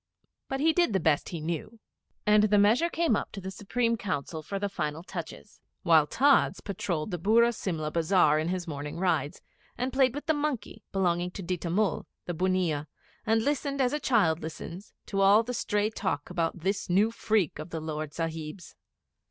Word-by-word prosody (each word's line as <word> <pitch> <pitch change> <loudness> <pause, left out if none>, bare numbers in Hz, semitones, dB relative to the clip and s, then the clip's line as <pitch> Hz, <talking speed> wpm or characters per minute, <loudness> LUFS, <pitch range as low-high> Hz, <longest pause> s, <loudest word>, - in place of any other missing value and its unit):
But 270 0 -3
he 320 +1 +4
did 345 - +2
the 190 - +2
best 155 -3 +1
he 170 - -5
knew. 170 +8 -4 0.5
And 210 0 +5
the 210 0 +3
measure 225 +12 +4
came 335 -8 +1
up - - -3
to 200 - -6
the 190 0 -6
Supreme 230 +4 -1
Council 160 -5 -3
for 195 +6 -4
the 200 +1 -1
final 155 -4 -3
touches, 170 - -8 0.2
while 160 -3 +5
Tods 275 - +3
patrolled 180 -3 -3
the 175 - -3
Burra 235 +6 +4
Simla 160 -8 -3
Bazar 160 -2 +3
in 155 - -1
his 180 0 -2
morning 145 -1 -5
rides, 175 -5 -1 0.3
and 255 +1 -2
played 265 -2 +3
with 290 - -5
the 320 - +3
monkey 290 -7 -3
belonging 180 -2 +1
to 190 +2 -8
Ditta 175 -1 -3
Mull, 200 +4 0 0.2
the 175 - -3
bunnia, 175 -4 0 0.4
and 225 0 +3
listened, 280 -1 -1
as 255 0 +2
a 300 - 0
child 200 - +2
listens, 170 +4 -7
to 195 -1 -1
all 200 +3 +6
the 250 +2 -4
stray 210 -2 0
talk 185 -8 -3
about 170 -1 -1
this 195 +3 -1
new 200 +5 +3
freak 215 -9 0
of 155 - -6
the 165 - -4
Lord 155 -1 -4
Sahib's. 165 +1 -5
190 Hz, 190 wpm, -28 LUFS, 165-225 Hz, 0.5 s, all